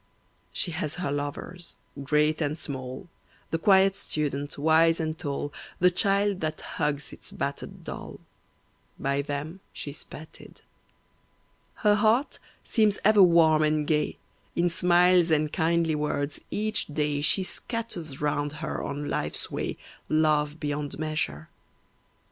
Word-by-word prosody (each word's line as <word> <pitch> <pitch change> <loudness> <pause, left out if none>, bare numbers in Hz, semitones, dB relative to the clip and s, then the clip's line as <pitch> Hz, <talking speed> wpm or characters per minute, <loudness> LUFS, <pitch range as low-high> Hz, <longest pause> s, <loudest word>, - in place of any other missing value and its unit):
She 175 - 0
has 155 -2 -2
her 180 -5 -2
lovers, 145 +5 -5 0.3
great 150 +3 +2
and 150 0 0
small, 130 +1 -6 0.4
The 165 - 0
quiet 195 +1 +5
student, 145 -3 -2
wise 160 +2 +4
and 155 -1 -1
tall, 145 -3 -4 0.2
The 180 +1 +4
child 200 +1 +2
that 155 -1 -2
hugs 150 -2 -2
its - - -9
battered - - -5
doll, - - -7 0.8
By 140 +1 0
them 145 +5 -5
she's 145 +1 -6
petted. 155 +2 -12 1.2
Her 210 - +7
heart 220 +6 +2 0.2
seems 215 -3 +2
ever 215 -1 +7
warm 165 -3 +6
and 155 -1 +2
gay, 150 0 0 0.4
In 175 0 +2
smiles 180 0 +5
and 155 -1 +2
kindly 165 0 +2
words, 150 -1 -2
each 215 +1 -1
day, 150 -1 -1
She 185 +6 +4
scatters 185 - -5
round 145 0 -1
her 155 0 -4
on 145 +1 -4
life's 75 - -2
way - - -3 0.3
Love 155 -1 +2
beyond 145 -1 -3
measure. 155 - -2
155 Hz, 130 wpm, -27 LUFS, 145-175 Hz, 1.2 s, Her